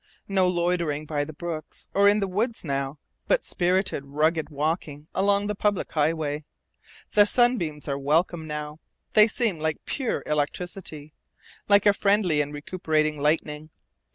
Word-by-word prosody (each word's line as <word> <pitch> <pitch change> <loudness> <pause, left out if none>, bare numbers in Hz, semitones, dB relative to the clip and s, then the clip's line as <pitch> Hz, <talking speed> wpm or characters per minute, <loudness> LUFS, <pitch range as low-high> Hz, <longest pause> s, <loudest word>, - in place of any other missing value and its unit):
No 190 -2 +2
loitering 170 -4 0
by 145 -1 -1
the 155 - -8
brooks 160 0 -6
or 200 +1 +5
in 205 +1 +2
the 195 - 0
woods 220 +3 -2
now, 140 0 -2 0.3
but - - +2
spirited, 180 -4 0
rugged 155 +3 0
walking 150 0 -3
along 200 +1 +2
the 210 - -1
public 205 -1 -1
highway. 150 -1 0 0.7
The 205 -1 +6
sunbeams 210 - +1
are 140 -1 -2
welcome 160 +3 +1
now. 150 0 -5 0.3
They 215 0 +8
seem 215 -6 0
like 160 0 -2
pure 260 -5 -2
electricity, 150 0 -3 0.6
like 200 0 +5
a 205 - +6
friendly 195 -7 +2
and 145 0 -3
recuperating 155 -1 -1
lightning. 150 0 0
160 Hz, 145 wpm, -25 LUFS, 150-195 Hz, 0.7 s, They